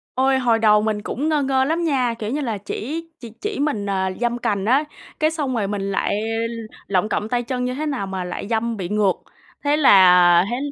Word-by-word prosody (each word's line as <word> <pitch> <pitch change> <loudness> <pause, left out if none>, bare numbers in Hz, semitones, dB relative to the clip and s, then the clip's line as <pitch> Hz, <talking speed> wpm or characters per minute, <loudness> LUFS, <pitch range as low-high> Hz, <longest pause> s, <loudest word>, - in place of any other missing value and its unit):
Ôi, 265 +1 +2
hồi 235 -3 +2
đầu 210 -1 +4
mình 215 -1 -1
cũng 295 +8 -3
ngơ 300 -2 +1
ngơ 265 -1 +2
lắm 330 +4 -1
nha, 255 -6 +1
kiểu, 215 0 -4
như 295 +3 -2
là 225 -7 -3
chỉ 305 +11 -5
chỉ 235 -2 -9
chỉ 420 -4 -4
mình, 280 -9 -1
à, 190 -1 -1
giâm 240 0 0
cành 200 -4 -1
á, 265 +7 +3 0.4
cái 310 +1 +3
xong 290 -5 -3
rồi 215 -4 0
mình 205 -1 -3
lại 195 - 0 0.7
lọng 200 +2 0
cọng 210 +1 -2
tay 245 0 0
chân 250 0 -3
như 250 0 -2
thế 305 +3 -3
nào 255 -9 -2
mà 190 -1 -4
lại 180 +2 -6
giâm 230 0 -1
bị 185 -4 -4
ngược. 205 -1 +2 0.5
Thế 290 +1 +2
là 180 - +6
thế 240 - -1
235 Hz, 225 wpm, -21 LUFS, 205-275 Hz, 0.7 s, là